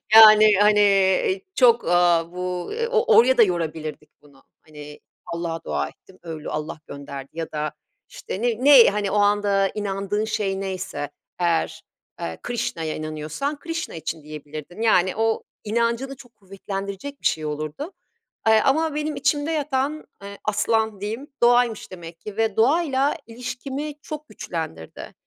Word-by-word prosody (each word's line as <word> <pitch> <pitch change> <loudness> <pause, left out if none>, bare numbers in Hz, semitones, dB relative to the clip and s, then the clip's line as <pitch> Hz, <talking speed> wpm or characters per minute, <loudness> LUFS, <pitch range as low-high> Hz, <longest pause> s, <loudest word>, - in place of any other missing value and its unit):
yani, 215 -1 +9
hani, 210 0 +5
eee, 190 -1 +3
çok, 235 -2 +5
eee, - - -3 0.4
bu 180 0 -4 0.2
o 460 0 +3
oraya 260 +2 +6
da 230 - +8
yorabilirdik 160 -4 -3
bunu, 140 -2 -21 0.2
hani, 150 -1 -12 0.3
Allah'a 170 -1 -4
dua 70 -1 -2
ettim, 190 -1 -21
öyle 160 -3 -6
Allah 155 0 -4
gönderdi 140 -1 -8
ya 165 -1 -5
da, 150 -1 -2 0.4
işte, 190 - -6
ne 240 +1 0
ne, 275 -5 +9
hani, 205 -1 -2
o - - -1
anda 205 -1 +3
inandığın 205 0 -2
şey 200 -3 -1
neyse 190 -6 -4 0.3
eğer, 170 -2 0 0.4
eee, 80 0 -4
Krishna'ya 190 -10 -3
inanıyorsan 155 - -4
Krishna 330 - -5
için 160 -1 -5
diyebilirdin. 155 +5 -9
Yani, 185 -5 +3
o 225 0 0 0.2
inancını 235 +5 -1
çok 245 -3 -16
kuvvetlendirecek 195 +6 -7
bir - - -13
şey 155 -1 -1
olurdu, 155 - -4 0.6
eee, 220 0 +6
ama 310 +2 +2
benim 300 0 -2
içimde 290 +1 0
yatan, 295 0 -1 0.2
ııı, 200 0 -8
aslan 215 0 0
diyeyim, 225 +7 -4 0.2
doğaymış 240 -3 +3
demek 170 -2 -10
ki 210 -1 -8
ve 225 -2 +1
doğayla 275 +2 +2
ilişkimi 260 +5 -5
çok 305 -1 -8
güçlendirdi. 80 - -7
205 Hz, 140 wpm, -23 LUFS, 165-245 Hz, 0.6 s, yani